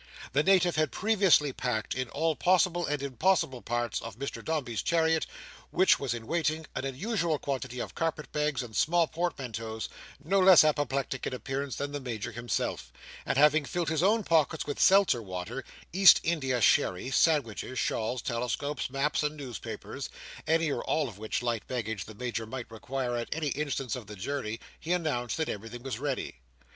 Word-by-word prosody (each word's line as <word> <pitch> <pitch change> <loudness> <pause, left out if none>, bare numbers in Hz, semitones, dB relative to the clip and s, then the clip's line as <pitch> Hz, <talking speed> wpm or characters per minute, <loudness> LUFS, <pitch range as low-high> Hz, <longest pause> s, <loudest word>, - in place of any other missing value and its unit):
The 145 - +4
Native 180 -1 +3
had 155 -2 +2
previously 195 -9 +3
packed, 120 -4 -2
in 130 -1 -3
all 160 +4 0
possible 175 0 +2
and 145 -1 -2
impossible 135 -1 +1
parts 120 -2 -2
of 115 -2 -8
Mr 140 +2 -5
Dombey's 135 -9 -2
chariot, 160 -1 +2 0.4
which 185 - +4
was 130 -4 -1
in 115 -1 -7
waiting, 160 +1 0
an 130 - -3
unusual 165 - -1
quantity 130 -3 -4
of - - -5
carpet 160 -2 -2
bags 150 -3 0
and 110 -3 -10
small 170 - +3
portmanteaus, 125 -10 -4 0.4
no 195 +4 +3
less 185 -3 +8
apoplectic 140 -3 0
in 130 - -3
appearance 135 +3 -4
than 140 0 -3
the 145 - -3
Major 120 -3 -4
himself: 120 +1 -3 0.4
and - - 0
having 150 +1 +5
filled 170 +2 -2
his 160 -1 0
own 215 +4 +3
pockets 160 -2 +2
with 145 - -4
Seltzer 190 -11 +5
water, 95 +6 -5 0.3
East 195 +1 +8
India 135 -7 0
sherry, 95 +3 +3
sandwiches, 130 -5 +1
shawls, 115 +2 -1
telescopes, 125 +5 -2
maps, 140 +3 0
and 150 0 -2
newspapers, 125 -8 -6 0.4
any 160 -1 +2
or - - -2
all 155 -3 0
of 100 -3 -13
which 110 +2 -2
light 120 -3 -2
baggage 110 -6 -3
the 110 - -11
Major 120 -1 -3
might 120 -1 -6
require 130 +1 -3
at 120 - -4
any 155 -2 -1
instant 140 -3 -2
of 120 -5 -8
the 105 - -8
journey, 115 +1 -3 0.2
he 170 +3 -1
announced 150 -9 -1
that 160 -1 0
everything 115 +3 -6
was 130 -4 -4
ready. 135 - -3
140 Hz, 175 wpm, -29 LUFS, 120-160 Hz, 0.4 s, less